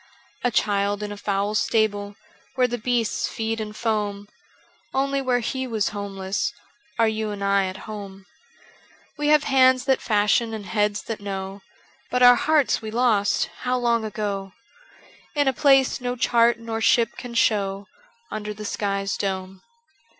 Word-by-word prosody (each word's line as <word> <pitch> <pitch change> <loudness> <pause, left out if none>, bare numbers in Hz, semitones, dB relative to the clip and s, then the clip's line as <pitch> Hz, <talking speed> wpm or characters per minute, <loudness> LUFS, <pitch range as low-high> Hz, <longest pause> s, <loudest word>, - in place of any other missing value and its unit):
A 245 - +3
Child 205 -2 0
in 205 - -4
a - - -5
foul 200 0 -1
stable. 205 -2 0 0.4
Where 255 -1 +3
the 245 0 -4
beasts 235 -1 0
feed 225 0 -3
and 210 0 -6
foam. 205 -3 -2 0.7
Only 275 +1 +1
where 250 -2 +1
He 260 +3 -3
was 220 -4 0
homeless 200 0 -3 0.4
Are 230 -1 +4
you 220 0 -1
and 205 -1 -5
I 200 -1 +2
at 185 +1 -8
home: 200 -3 -8 0.9
We 295 -1 -2
have 300 -1 +5
hands 260 -2 +4
that 265 -1 +2
fashion 220 +1 +2
and 210 -2 -7
heads 210 0 0
that 225 -2 -5
know, 195 0 -5 0.5
But 250 0 +1
our 245 0 +10
hearts 295 +2 +2
we 220 - -6
lost 215 -3 +1
— - - -17
how 250 0 0
long 235 -2 +1
ago 200 -3 -4 0.8
I 290 - +2
In 285 - +2
a 265 - +3
place 270 -1 +3
no 245 0 -2
chart 235 -1 +3
nor 225 -1 -5
ship 235 0 +3
can 245 -1 -8
show 200 -3 +1 0.4
Under 210 -1 -5
the 210 0 -8
sky's 200 -1 -2
dome. 190 -1 -4
215 Hz, 165 wpm, -24 LUFS, 200-245 Hz, 0.9 s, our